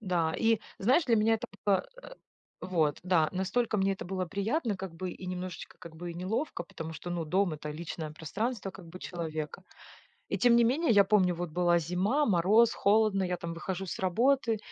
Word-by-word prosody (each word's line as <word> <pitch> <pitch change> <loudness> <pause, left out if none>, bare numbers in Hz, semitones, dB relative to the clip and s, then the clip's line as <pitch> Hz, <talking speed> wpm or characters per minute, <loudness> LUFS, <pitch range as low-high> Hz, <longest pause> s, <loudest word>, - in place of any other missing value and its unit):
Да, 175 -6 0
и 225 -1 +2 0.2
знаешь, 260 - +3
для 235 -3 +3
меня 220 +1 +3
это 220 - -4 0.2
было, 200 -2 +2 0.2
э, - - -11 0.5
вот 160 -6 0
да 175 -4 +3
настолько 215 +5 0
мне 195 -1 +2
это 190 - -6
было 185 0 -2
приятно, 210 - -1
как 185 -2 -7
бы, 180 +2 -4
и 185 - -9
немножечко, 180 -1 -6
как 165 -1 -11
бы, 175 +1 -6
и - - -8
неловко. 185 - -3
Потому 160 -1 -7
что, 175 +2 -7
ну 175 -1 -2
дом 185 +3 +1
это 150 0 -6
личное 160 0 -5
пространство 200 - -3
как 180 -1 -13
бы 180 +2 -10
человека. 160 -4 -5 0.7
И - - -1
тем 240 -1 +5
не 235 - +5
менее, 280 +7 +2
я 205 -3 +6
помню, 190 -3 +3
вот 175 -1 -4
была 175 +1 +3
зима, 185 - +1
мороз, 210 +5 +4
холодно, 205 -1 +3
я 180 -1 -1
там 170 -1 -5
выхожу 190 +2 -4
с - - -5
работы, 230 +5 +2
185 Hz, 200 wpm, -30 LUFS, 170-215 Hz, 0.7 s, я